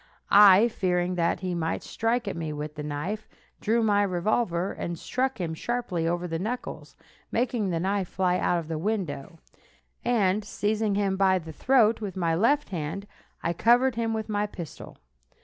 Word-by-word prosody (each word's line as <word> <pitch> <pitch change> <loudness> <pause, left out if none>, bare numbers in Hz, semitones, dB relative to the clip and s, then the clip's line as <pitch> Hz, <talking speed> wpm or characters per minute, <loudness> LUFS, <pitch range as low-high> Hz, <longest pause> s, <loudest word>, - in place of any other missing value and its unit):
I, 205 +2 +8
fearing 180 -5 0
that 170 +1 0
he 185 -1 -2
might 165 -1 -2
strike 230 +1 -1
at - - -2
me 160 -2 -3
with 150 0 -5
the 150 - -6
knife, 150 +9 -4 0.3
drew 225 +2 +1
my 205 -2 +3
revolver 185 -1 0
and 170 0 -4
struck 255 +5 -2
him 165 -3 -2
sharply 185 -4 -2
over 175 +1 -1
the 165 -1 -3
knuckles, 235 +7 -5 0.4
making 235 -4 0
the 170 -2 -1
knife 190 +1 0
fly 180 0 0
out 175 - +1
of 165 -2 -4
the 160 -1 -3
window, 165 -7 -3 0.7
and 210 -4 +2
seizing 210 0 -1
him 195 -1 0
by 190 -1 +4
the 160 -3 -7
throat 230 - +3
with 195 -3 -5
my 170 -3 +1
left 280 - +2
hand, 175 +2 -4 0.4
I 170 - 0
covered 240 +8 +4
him 230 0 -1
with 220 -1 -2
my 210 -1 0
pistol. 170 -6 -9
195 Hz, 175 wpm, -27 LUFS, 170-220 Hz, 0.7 s, I